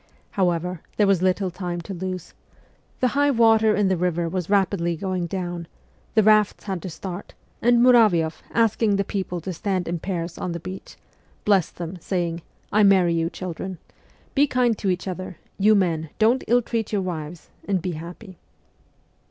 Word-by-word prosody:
However, 180 -2 0 0.2
there 210 - +4
was 195 -3 +3
little 185 0 +1
time 175 -1 -4
to 195 - -7
lose; 185 -1 -5 0.7
the 255 - +4
high 285 +2 +2
water 225 -4 +4
in 205 -2 +2
the 190 - +2
river 175 -1 0
was 180 0 -3
rapidly 190 -4 +1
going 185 0 -2
down, 175 -2 -4 0.5
the 220 - +5
rafts 215 -1 +4
had 190 -4 -4
to 185 - -5
start, 180 +3 -7 0.3
and 240 0 +4
Muravioff, 210 -11 +4
asking 225 -2 +2
the 200 - +1
people 190 -3 -3
to 185 +3 -4
stand 185 0 -2
in 170 0 -2
pairs 170 -2 -4
on 175 - -3
the 170 - -4
beach, 185 +3 -9 0.5
blessed 195 -5 +2
them, 175 +1 -6
saying: 170 -2 -2 0.2
' - - -38
I 215 - +5
marry 190 -4 +5
you, 165 0 0
children. 185 +1 -6 0.6
Be 290 +1 +4
kind 250 -3 +2
to 195 - -1
each 180 +1 -1
other; 185 -2 -5 0.2
you 215 +2 +5
men, 165 -5 0
don't 230 +4 +3
ill 245 +1 +3
treat 225 -2 -2
your 200 -3 0
wives 165 -2 -6 0.2
and 195 -2 +1
be 180 +1 -3
happy 175 +4 -9
185 Hz, 175 wpm, -23 LUFS, 175-210 Hz, 0.7 s, the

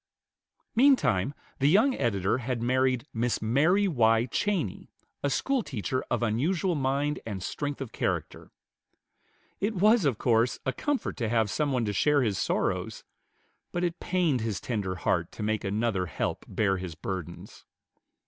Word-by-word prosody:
Meantime 235 - +4 0.3
the 140 +1 +4
young 220 - +4
editor 110 - 0
had 125 0 -2
married 130 +1 +1
Miss 120 +1 0
Mary 155 - +3
Y. 115 -7 +3
Cheney, 165 - -2 0.3
a 140 - 0
schoolteacher 135 - -1
of - - 0
unusual 160 - +1
mind 140 0 0
and 100 -4 -5
strength 145 +5 -3
of 135 -5 -6
character. - - -3 1.1
It 210 +2 -1
was, 210 +1 +4
of 130 -7 +1
course, 115 +1 +2
a 130 - 0
comfort 290 -2 -2
to 115 -5 -1
have 110 -3 +1
some 150 -2 0
one 125 -3 0
to 105 - -1
share 140 +8 +3
his 100 -6 0
sorrows; - - -1 0.7
but 175 - -2
it 175 -1 -1
pained 170 -9 +1
his 110 -3 -2
tender 100 -6 -3
heart 90 - 0
to - - -6
make 110 0 -1
another 100 -2 0
help - - -3
bear 95 -3 +1
his 90 -3 -6
burdens. 85 0 -7
125 Hz, 150 wpm, -28 LUFS, 110-155 Hz, 1.1 s, Meantime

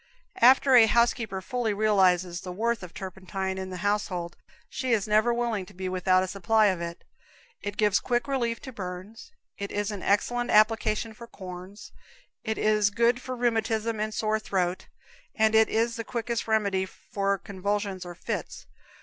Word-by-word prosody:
After 260 +2 +6
a 235 -3 +8
housekeeper 230 -3 +1
fully 235 -1 -1
realizes 185 -4 +2
the 180 - -6
worth 230 +4 -1
of 180 -2 -9
turpentine 190 0 -5
in 190 0 -5
the 185 +1 -6
household, 185 -4 -1 0.3
she 255 -1 -2
is 215 -2 +1
never 215 +3 +3
willing 235 -4 -1
to - - -15
be 185 0 -4
without 185 0 +2
a - - -3
supply 200 +4 +2
of 175 - -7
it. 170 0 -6 0.6
It 205 0 -5
gives 210 -2 +3
quick 240 +1 -1
relief 240 -4 -1
to 265 - -8
burns, 190 - -8 0.3
it 200 0 -4
is 205 +1 -2
an 205 -2 -6
excellent 240 +4 +1
application 215 +1 +3
for 235 +1 -11
corns, 185 +1 -10 0.5
it 220 -1 -2
is 215 -1 +3
good 235 +4 +2
for 255 0 -5
rheumatism 225 -2 0
and 215 +1 -1
sore 215 0 0
throat, 185 -4 -2 0.5
and 220 0 +3
it 220 0 +5
is 230 +1 0
the 230 - -3
quickest 235 0 -3
remedy 200 -4 +1
for 200 +1 -2
convulsions 200 0 -3
or 175 -1 -8
fits. - - -5
210 Hz, 170 wpm, -27 LUFS, 190-230 Hz, 0.6 s, a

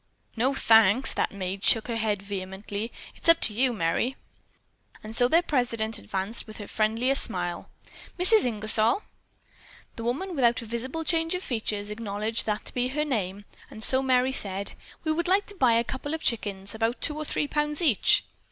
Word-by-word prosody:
"No, 255 +4 0
thanks!" 225 +1 +5
That - - -1
maid 190 0 -5
shook 225 - +3
her 235 - -3
head 215 -3 -1
vehemently. 200 +2 -6 0.2
"It's - - -1
up 330 0 +7
to 215 - +2
you, 250 +4 +2
Merry." 220 +6 -1 0.9
And 215 +1 -5
so 245 - +5
their 330 +6 +3
president 235 -7 0
advanced 190 - -4
with 215 - -10
her 205 - -8
friendliest 230 +5 +1
smile. 175 -5 -4 0.5
"Mrs. 370 +5 +6
Ingersol?" 220 - +3 0.9
The 230 - -6
woman, 325 +11 -3
without 240 -3 +2
a - - -9
visible 250 +8 -4
change 325 +1 0
of 365 - -5
features, 210 -3 -3
acknowledged 215 +1 -3
that 210 0 -2
to - - -6
be 245 0 0
her 300 +4 -1
name, 205 -7 -3 0.2
and 220 - -7
so 260 +3 +5
Merry 260 -1 +2
said: 200 -6 +1 0.3
"We 315 - 0
would 340 +2 -1
like 390 +2 +2
to 410 - -7
buy 255 -10 +3
a 230 +1 +3
couple 275 +5 -4
of 320 - -8
chickens 200 -4 -2
of 220 - -10
about 230 +2 0
two 300 - -2
or 305 - -4
three 295 - -2
pounds 295 0 -1
each." 265 - +4
230 Hz, 190 wpm, -26 LUFS, 210-275 Hz, 0.9 s, up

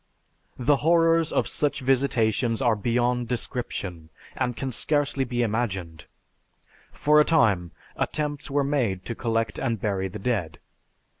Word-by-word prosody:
The 140 +3 +3
horrors 165 +1 +3
of - - +1
such 145 -3 0
visitations 120 -3 +1
are 120 -4 +3
beyond 120 +3 0
description, 100 -9 -4 0.3
and 125 -2 -1
can 135 +1 -3
scarcely 145 +1 0
be 120 0 -1
imagined. 95 -8 -3 0.9
For 150 +1 +3
a - - +6
time, 105 - +2 0.3
attempts 145 -2 -3
were 140 +1 +1
made 120 -10 -1
to 115 - -3
collect 115 0 -1
and 115 -2 -1
bury 95 -2 -1
the 95 +3 -7
dead. 100 -9 -2
120 Hz, 135 wpm, -25 LUFS, 105-140 Hz, 0.9 s, a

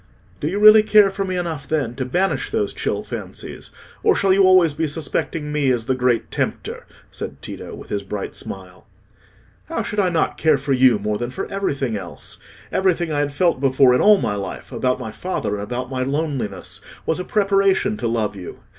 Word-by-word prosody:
"Do 145 - -2
you 185 +5 -1
really 215 +1 +9
care 210 -2 +5
for 195 0 -3
me 185 -1 -3
enough, 160 -6 -4
then, 145 -7 -1
to 130 - -2
banish 180 +9 0
those - - -1
chill - - -2
fancies, - - -7 0.3
or 430 - +4
shall 195 -1 +3
you 195 0 +5
always 185 -4 +5
be 160 +2 -1
suspecting 150 0 -3
me 150 -2 +1
as 120 -3 0
the 130 - +1
Great 125 -2 0
Tempter?" - - -3 0.2
said - - -7
Tito, - - -8
with - - -12
his 100 - -2
bright 100 0 -5
smile. 90 -1 -9 0.8
"How - - -3
should 210 - -3
I 190 -3 +3
not 165 -2 0
care 155 -3 +4
for 135 0 -1
you 130 -3 +5
more 105 0 -2
than 120 - -3
for 130 - -4
everything 140 - -1
else? 90 -3 -8 0.3
Everything 175 -3 +1
I 145 - 0
had 145 0 0
felt 155 -1 +1
before 130 -1 +5
in 125 - +3
all 210 0 +7
my 105 - -1
life—about 120 +6 -3
my 115 -4 -5
father, 180 - -3
and 100 0 -3
about 125 +4 -4
my 130 -1 -2
loneliness—was 140 - -3
a - - -2
preparation 195 0 +2
to 115 - -2
love 110 -3 -1
you. 95 -3 -9
145 Hz, 200 wpm, -21 LUFS, 120-185 Hz, 0.8 s, really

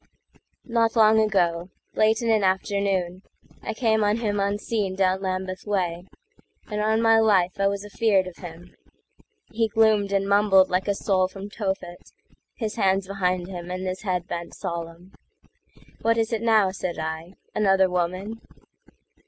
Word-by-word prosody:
Not 230 -2 +1
long 220 -1 +5
ago, 180 -5 +1 0.2
late 220 +2 +2
in 230 - +2
an 215 -2 +2
afternoon,I 190 0 -2
came 220 -2 +2
on 205 +1 +2
him 210 -3 -1
unseen 200 0 -1
down 190 0 +1
Lambeth 185 0 -4
way, 180 -3 -2 0.6
And 210 -1 -3
on 220 +1 +1
my 225 0 +5
life 195 -4 +2
I 195 - +3
was 200 0 -3
afear'd 205 -2 +1
of 185 -2 -10
him:He 190 - -8
gloomed 215 -2 +2
and 195 0 0
mumbled 200 -2 +4
like 185 +2 0
a 200 - +1
soul 190 -2 +1
from 195 +2 -9
Tophet, 190 -5 -5 0.4
His 220 -1 -4
hands 195 -2 +2
behind 185 -2 -1
him 175 -2 -7
and 185 +1 -4
his 185 0 -4
head 180 -4 -2
bent 170 0 -6
solemn."What 170 +6 -6
is 225 +1 0
it 220 - -1
now," 220 -4 +3
said 185 -2 -4
I,—"another 185 +5 0
woman?" 185 +5 -3
195 Hz, 145 wpm, -24 LUFS, 185-215 Hz, 0.6 s, long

